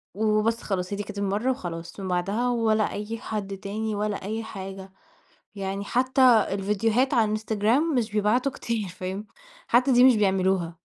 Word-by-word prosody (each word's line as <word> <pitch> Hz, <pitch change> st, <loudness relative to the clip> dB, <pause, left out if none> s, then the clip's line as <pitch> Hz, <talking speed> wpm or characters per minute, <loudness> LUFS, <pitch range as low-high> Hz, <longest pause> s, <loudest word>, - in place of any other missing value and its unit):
وبس 215 Hz, +2 st, +1 dB
خلاص، 185 Hz, -1 st, -3 dB
هي -, -, -2 dB
دي 205 Hz, -, -3 dB
كانت 205 Hz, 0 st, -9 dB
المرّة 200 Hz, +5 st, 0 dB
وخلاص، 170 Hz, -6 st, -6 dB
من 190 Hz, -, -4 dB
بعدها 195 Hz, +7 st, 0 dB
ولا 220 Hz, -3 st, +1 dB
أي 210 Hz, +2 st, -4 dB
حد 200 Hz, -3 st, -5 dB
تاني، 210 Hz, +2 st, -3 dB
ولا 210 Hz, 0 st, -2 dB
أي 220 Hz, +3 st, -3 dB
حاجة، 195 Hz, -2 st, -8 dB, 0.6 s
يعني 195 Hz, 0 st, -4 dB
حتّى 255 Hz, +4 st, +1 dB, 0.3 s
الفيديوهات 210 Hz, +7 st, +1 dB
على 230 Hz, -3 st, +4 dB
الإنستجرام 220 Hz, +8 st, +1 dB
مش 230 Hz, -4 st, 0 dB
بيبعتوا 220 Hz, +6 st, +1 dB
كتير، 225 Hz, -5 st, -3 dB
فاهم، 185 Hz, +3 st, -6 dB, 0.4 s
حتّى 250 Hz, +3 st, +3 dB
دي 245 Hz, 0 st, +6 dB
مش 255 Hz, -3 st, +7 dB
بيعملوها. 190 Hz, -4 st, +1 dB
210 Hz, 160 wpm, -25 LUFS, 195-230 Hz, 0.6 s, مش